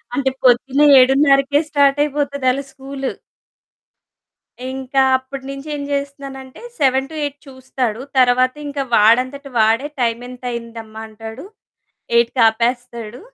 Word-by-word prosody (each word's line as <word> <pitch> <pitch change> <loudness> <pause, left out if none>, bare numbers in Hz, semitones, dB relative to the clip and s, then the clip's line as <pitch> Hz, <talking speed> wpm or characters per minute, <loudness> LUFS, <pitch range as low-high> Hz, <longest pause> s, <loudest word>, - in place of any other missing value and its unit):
అంటే 270 -1 +1
పొద్దున్న 260 +3 +3 0.2
7:౩౦కే 275 +2 +4
స్టార్టయిపోతది 285 -1 +1
ఆళ్ళ 270 +2 -2
స్కూలు. 270 0 -5 1.6
ఇంకా 265 0 0 0.2
అప్పటి 265 +1 -9
నుంచి 275 +2 -8
ఏం 285 - -5
చేస్తున్నానంటే 275 -2 -6 0.2
7-8 285 +2 0
చూస్తాడు. 260 -3 -4 0.2
తర్వాత 255 0 +3
ఇంక 285 0 -6 0.2
వాడంతట 255 +6 +3
వాడే 225 +6 +2
టైమెంతయిందమ్మా 235 -2 -4
అంటాడు. 220 +4 -10 0.7
ఎయిట్‌కాపేస్తాడు. 235 0 0
260 Hz, 90 wpm, -18 LUFS, 240-275 Hz, 1.6 s, 7:౩౦కే